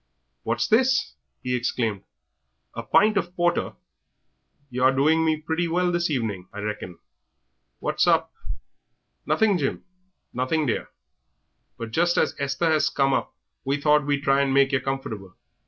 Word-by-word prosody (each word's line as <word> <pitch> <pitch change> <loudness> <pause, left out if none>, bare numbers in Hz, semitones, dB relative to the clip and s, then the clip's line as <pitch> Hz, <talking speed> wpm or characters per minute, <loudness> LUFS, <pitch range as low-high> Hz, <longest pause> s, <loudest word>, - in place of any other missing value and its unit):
"What's - - -1
this?" 260 +4 +2 0.3
he 125 0 -1
exclaimed; 115 -4 -1 0.7
"a 115 - -5
pint 205 - +3
of 175 -1 -2
porter! 175 -1 0 1.0
Yer 125 +1 0
are 130 - +6
doing 155 +4 +3
me 155 -1 +1
pretty 160 +2 -2
well 175 +2 +1
this 175 0 0
evening, 110 -10 -3
I - - -11
reckon. 105 -4 -5 0.8
What's - - 0
up?" - - +2 0.9
"Nothing, 190 +5 +2
Jim; 135 - -2 0.5
nothing, 140 +5 0
dear, 120 - -2 0.9
but 115 -1 -6
just 175 +7 +1
as - - +2
Esther 140 +4 0
has 155 -1 +2
come 135 -1 +1
up - - -2 0.3
we 140 +1 -1
thought 150 0 +3
we'd 145 -1 0
try 135 0 +3
to 140 - 0
make 135 +1 +3
yer 135 - +2
comfortable. 115 -8 -5
140 Hz, 150 wpm, -24 LUFS, 125-170 Hz, 1.0 s, are